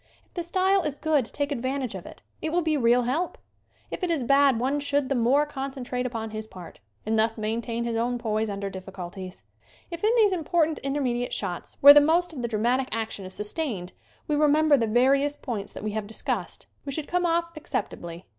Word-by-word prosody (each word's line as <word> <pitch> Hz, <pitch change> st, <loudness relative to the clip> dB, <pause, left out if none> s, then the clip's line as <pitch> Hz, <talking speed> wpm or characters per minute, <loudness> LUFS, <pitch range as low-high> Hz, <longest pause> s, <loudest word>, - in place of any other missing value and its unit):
If -, -, -38 dB
the 350 Hz, -, -3 dB
style 375 Hz, +3 st, +2 dB
is 295 Hz, -4 st, -3 dB
good 305 Hz, -5 st, +1 dB
take 285 Hz, +5 st, -3 dB
advantage 260 Hz, -2 st, -2 dB
of 190 Hz, -3 st, -8 dB
it. -, -, -13 dB, 0.2 s
It 315 Hz, -, -2 dB
will 350 Hz, +1 st, +1 dB
be 315 Hz, -1 st, +1 dB
real 245 Hz, -2 st, +3 dB
help. 305 Hz, +9 st, -1 dB, 0.5 s
If -, -, -5 dB
it 360 Hz, -, -1 dB
is 320 Hz, -6 st, 0 dB
bad 275 Hz, -1 st, +4 dB
one 270 Hz, +4 st, 0 dB
should 285 Hz, -1 st, 0 dB
the -, -, +2 dB
more 260 Hz, +4 st, +3 dB
concentrate 265 Hz, -3 st, -4 dB
upon 225 Hz, -3 st, -5 dB
his 215 Hz, 0 st, -6 dB
part 180 Hz, -5 st, -11 dB, 0.3 s
and 220 Hz, +1 st, +1 dB
thus 225 Hz, +1 st, +1 dB
maintain 230 Hz, +2 st, -2 dB
his 235 Hz, -1 st, -2 dB
own 240 Hz, +2 st, 0 dB
poise 220 Hz, -2 st, -1 dB
under 200 Hz, 0 st, -3 dB
diffculties. 185 Hz, 0 st, -8 dB, 0.5 s
If 340 Hz, +2 st, -6 dB
in 430 Hz, -, +4 dB
these 420 Hz, -4 st, +5 dB
important 325 Hz, -2 st, +1 dB
intermediate 260 Hz, -3 st, -1 dB
shots 180 Hz, -4 st, -4 dB
where 285 Hz, +1 st, +12 dB
the 295 Hz, -, +8 dB
most 335 Hz, +3 st, +2 dB
of 265 Hz, -, -5 dB
the 235 Hz, -, -1 dB
dramatic 240 Hz, +4 st, 0 dB
action 220 Hz, -3 st, -3 dB
is 185 Hz, -, -7 dB
sus 210 Hz, 0 st, -4 dB
tained 215 Hz, -, -3 dB, 0.4 s
we 300 Hz, -, +1 dB
remember 300 Hz, 0 st, +4 dB
the 230 Hz, -4 st, +1 dB
various 275 Hz, +5 st, +3 dB
points 225 Hz, -9 st, -5 dB
that -, -, -8 dB
we 215 Hz, -, -2 dB
have 215 Hz, -1 st, -3 dB
discussed 220 Hz, -, -3 dB, 0.2 s
we 280 Hz, -, -5 dB
should 295 Hz, +1 st, -3 dB
come 355 Hz, 0 st, +1 dB
off 335 Hz, 0 st, 0 dB
acceptably. 175 Hz, -, -5 dB
255 Hz, 210 wpm, -26 LUFS, 220-300 Hz, 0.5 s, where